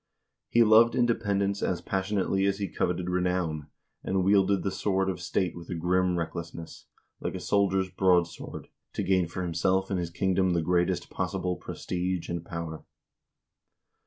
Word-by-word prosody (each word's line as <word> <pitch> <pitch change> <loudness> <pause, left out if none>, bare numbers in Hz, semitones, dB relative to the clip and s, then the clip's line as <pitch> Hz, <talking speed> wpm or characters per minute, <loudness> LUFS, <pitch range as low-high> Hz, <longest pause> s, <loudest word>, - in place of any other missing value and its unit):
He 120 - +5
loved 115 +1 +6
independence 100 -5 +1
as 90 - 0
passion 95 +2 -2
ately 95 0 +1
as 100 0 +1
he 100 -1 -2
coveted 90 +1 -1
renown, 90 -4 -1 0.4
and 95 -1 0
wielded 100 0 +3
the 95 - -1
sword 95 -1 0
of 90 - -7
state 90 0 -1
with 85 -1 -10
a 90 - -2
grim 90 +1 +1
recklessness, 85 0 -6 0.3
like - - -3
a - - -3
soldier's 95 -2 +1
broadsword, 90 -3 0 0.2
to - - -2
gain 95 -2 +2
for 90 +2 -4
himself 95 +3 0
and 95 - 0
his 85 -2 -2
kingdom 95 +1 +1
the 85 -1 +1
greatest 90 +1 0
possible 90 -1 -2
prestige 90 -1 -3
and 85 -1 -3
power. 85 -2 -6
95 Hz, 160 wpm, -28 LUFS, 85-95 Hz, 0.4 s, loved